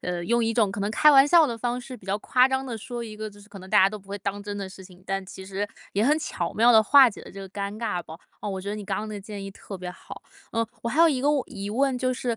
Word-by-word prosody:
呃， 175 -1 -3
用 235 +5 +2
一 225 - 0
种 215 -4 +2
可 200 - -5
能 200 +1 -1
开 300 +7 +5
玩 270 0 +7
笑 330 +1 +6
的 235 -4 -3
方 245 +2 -2
式， 255 +1 -9
比 200 - -19
较 195 +2 -1
夸 250 +4 +3
张 265 0 -1
地 240 -3 -4
说 240 +2 -6
一 215 -2 -9
个 215 0 -5
就 205 - -17
是 205 0 -16
可 200 -1 -11
能 190 +1 -12
大 - - +6
家 190 - +6
都 215 - -6
不 200 -1 -16
会 200 +1 -5
当 200 +1 -4
真 205 0 -5
的 195 -1 -5
事 190 0 -12
情， 180 -1 -16
但 195 0 -2
其 190 0 -10
实 195 +1 -2 0.3
也 205 +3 +1
很 300 +5 +3
巧 175 - -3
妙 235 +3 +5
地 220 -1 +7
化 270 +3 +7
解 210 - -10
了 - - -11
这 195 - -11
个 195 - -8
尴 200 +2 -5
尬 210 -6 -2
吧。 160 -1 -10 0.2
啊， - - -4
我 195 -1 -3
觉 195 - -7
得 - - -3
你 210 - -6
刚 - - -2
刚 215 - -4
那 215 - -6
个 205 - -6
建 205 0 -8
议 - - -6
特 195 +1 -9
别 180 0 -6
好。 180 - -11 0.3
呃， 230 0 0 0.2
我 235 - -1
还 290 +7 +1
有 335 - +7
一 270 -5 0
个 285 +3 +3
问 290 -3 +2
疑 200 -4 -6
问 265 +3 +1
就 255 0 0
是 245 -2 -2
215 Hz, 365 characters per minute, -25 LUFS, 195-245 Hz, 0.3 s, 玩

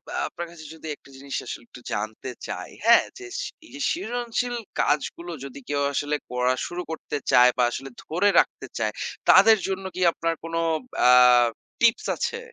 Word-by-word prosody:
আ - - -2
আপনার 175 -1 -6
কাছে 155 -2 -12
যদি 160 0 -10
একটা 135 - -21
জিনিস 140 0 -7
আসলে - - -7
একটু 125 - -13
জানতে 110 +4 -4 0.2
চাই, - - -5 0.2
হ্যাঁ? 235 0 +7
যে 385 - -9
স - - -1 0.2
এই - - -16
যে - - -8
সৃজনশীল 245 -4 -2 0.2
কাজগুলো 160 +4 0
যদি 140 +1 -9
কেউ 145 -1 0
আসলে 145 +2 0
করা 125 +1 +1
শুরু 175 +1 -5
করতে 150 -2 -4
চায় 125 0 +7
বা 125 - +3
আসলে 135 +3 -6
ধরে 180 +6 +2
রাখতে - - -1
চায়, - - 0 0.4
তাদের 225 -1 +8
জন্য 195 0 -3
কী 185 - -4
আপনার 165 0 -1
কোন 165 0 -7 0.5
আ - - +7 0.7
টিপস 230 -1 +3
আছে? 465 - -2
165 Hz, 175 wpm, -25 LUFS, 135-225 Hz, 0.7 s, তাদের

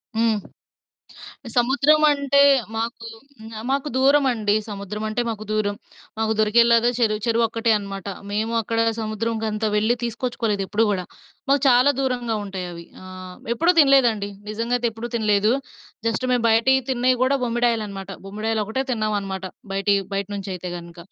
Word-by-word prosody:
హ్మ్. 225 -1 +2 1.2
సముద్రం 275 +5 +4
అంటే 280 0 +2 0.4
మాకు 230 +1 -4 0.7
మాకు 275 +2 0
దూరమండి. 260 -6 +3
సముద్రం 205 +1 -5
అంటే 215 +3 -2
మాకు 215 -2 -4
దూరం 210 -1 0 0.4
మాకు 220 0 +1
దొరికేలా 235 +2 +5 0.2
చెరువు 215 -2 +1
చెరువు 230 0 +2
ఒక్కటే 230 0 -1
అనమాట. 195 -1 -7 0.2
మేము 220 +2 -1
అక్కడ 225 +2 -3 0.2
సముద్రంకంతా 220 0 -2
వెళ్ళి 220 +3 +2
తీసుకొచ్చుకోలేదు 230 -3 -2
ఎప్పుడు 220 +4 +1
కూడా. 185 -3 -1 0.5
మాకు 280 -1 +4
చాలా 250 +3 +5
దూరంగా 245 -4 -1
ఉంటాయి 190 -2 -5
అవి. 170 0 -9 0.2
ఆ! - - -11 0.5
ఎప్పుడూ 335 +9 +3
తినలేదండి. 245 -8 +4 0.2
నిజంగా 230 +3 -2
అయితే 240 -1 0
ఎప్పుడూ 225 +2 -6
తినలేదు. 215 -1 +2 0.5
జస్ట్ 230 +3 0
మేము 240 -2 +1
బయటివి 260 +4 +4
తిన్నయి 255 0 +2
గూడా 270 +2 +3
బొమ్మిడాయలనమాట. 225 -5 -1 0.2
బొమ్మిడాయలు 215 +2 -2
ఒకటే 260 +5 -2
తిన్నాం 215 -3 -1
అనమాట. 190 -1 -5 0.3
బయటియి 200 0 +2
బయట 200 0 -1
నుంచి 195 0 -6
అయితే 180 0 -6
గనుక. 170 0 -11
225 Hz, 140 wpm, -22 LUFS, 210-245 Hz, 1.2 s, దొరికేలా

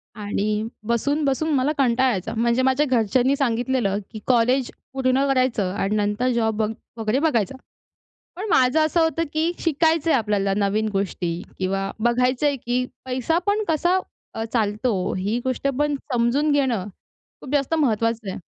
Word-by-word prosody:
आणि 210 0 -1 0.2
बसून-बसून 280 +5 0
मला 270 +3 +2
कंटाळा 260 -1 +3
यायचा, 190 -2 -3
म्हणजे 235 +2 +2
माझ्या 265 +3 +2
घरच्यांनी 255 +2 +2
सांगितलं 245 -5 0
की 220 - -7
कॉलेज 250 +1 +2 0.2
पूर्ण 265 0 +2
करायचं 255 -8 +1
आणि 200 +1 -1
नंतर 210 +4 0
जॉब 225 -2 +1
बघ 215 - +1 0.3
वगैरे 225 +3 0
बघायचा. 270 - +1 0.8
पण 405 +4 -4
माझं 255 +2 +4
असं 315 +2 +1
होतं, 325 0 +1
की 320 +2 +1
शिकायचंय 325 0 +2
आपल्याला 205 -5 +1
नवीन 210 +2 +1
गोष्टी 190 -3 -2 0.3
किंवा 195 +1 -1
बघायचंय 250 +4 +2
की 245 +1 +1 0.2
पैसा 260 +6 0
पण 415 +1 +1
कसा 345 +4 +2 0.4
अ, 225 - -3
चालतो 215 -3 0
ही 200 +5 -1
गोष्ट 260 +1 -1
पण 295 0 +1 0.2
समजून 245 +5 +2
घेणं 260 -9 +1 0.6
खूप 265 - -9
जास्त 285 +2 +1
महत्वाचं 230 -5 0
आहे. - - -6
250 Hz, 145 wpm, -23 LUFS, 215-280 Hz, 0.8 s, माझं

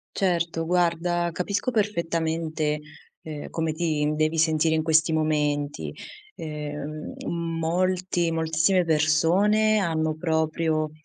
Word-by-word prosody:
Certo, 170 -3 0
guarda 175 0 +1
capisco 200 +8 -1
perfettamente, 165 -7 -1 0.4
ehm, 150 -2 -7
come 160 -1 -1
ti 155 -2 0
devi 155 +1 +1
sentire 160 0 +3
in 155 - 0
questi 160 0 +3
momenti. 150 -2 0 0.4
Ehm, 150 0 -6
molti 170 +1 0
moltissime 160 +3 +2
persone 175 +8 +3
hanno 160 -4 0
proprio, 160 -1 0
160 Hz, 100 wpm, -25 LUFS, 155-175 Hz, 0.4 s, sentire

